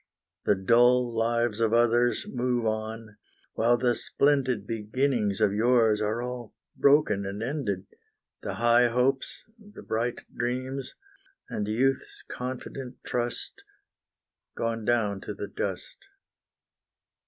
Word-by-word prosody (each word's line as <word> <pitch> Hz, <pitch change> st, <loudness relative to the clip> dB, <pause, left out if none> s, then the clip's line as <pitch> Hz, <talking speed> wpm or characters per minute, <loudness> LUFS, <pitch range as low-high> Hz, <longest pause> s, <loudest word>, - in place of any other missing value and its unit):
The 105 Hz, -, +4 dB
dull 120 Hz, +5 st, +4 dB
lives 115 Hz, -1 st, 0 dB
of 115 Hz, -1 st, +2 dB
others 120 Hz, +1 st, +3 dB
move 125 Hz, -1 st, -1 dB
on, 110 Hz, 0 st, -3 dB, 0.4 s
while 120 Hz, +2 st, +3 dB
the 120 Hz, 0 st, +2 dB
splendid 130 Hz, -6 st, +1 dB
Beginnings 110 Hz, -1 st, 0 dB
of 100 Hz, -, +3 dB
yours 110 Hz, -1 st, +3 dB
are 110 Hz, +3 st, -1 dB
all 125 Hz, -2 st, -6 dB, 0.2 s
broken 140 Hz, -8 st, +4 dB
and 100 Hz, +2 st, -4 dB
ended, 115 Hz, -8 st, -2 dB, 0.6 s
The -, -, -4 dB
high 120 Hz, +1 st, +4 dB
hopes, 125 Hz, +3 st, 0 dB, 0.2 s
the 210 Hz, -1 st, -13 dB
bright 115 Hz, +2 st, -2 dB
dreams, 130 Hz, +2 st, -3 dB, 0.6 s
and 105 Hz, -, -2 dB
youth's 130 Hz, +5 st, 0 dB
confident 125 Hz, 0 st, -6 dB
trust, 120 Hz, 0 st, -3 dB, 1.0 s
Gone 115 Hz, -1 st, -2 dB
down 105 Hz, -5 st, +1 dB
to 105 Hz, -, -6 dB
the 100 Hz, -, -5 dB
dust. 100 Hz, -1 st, -5 dB
120 Hz, 115 wpm, -27 LUFS, 110-125 Hz, 1.0 s, The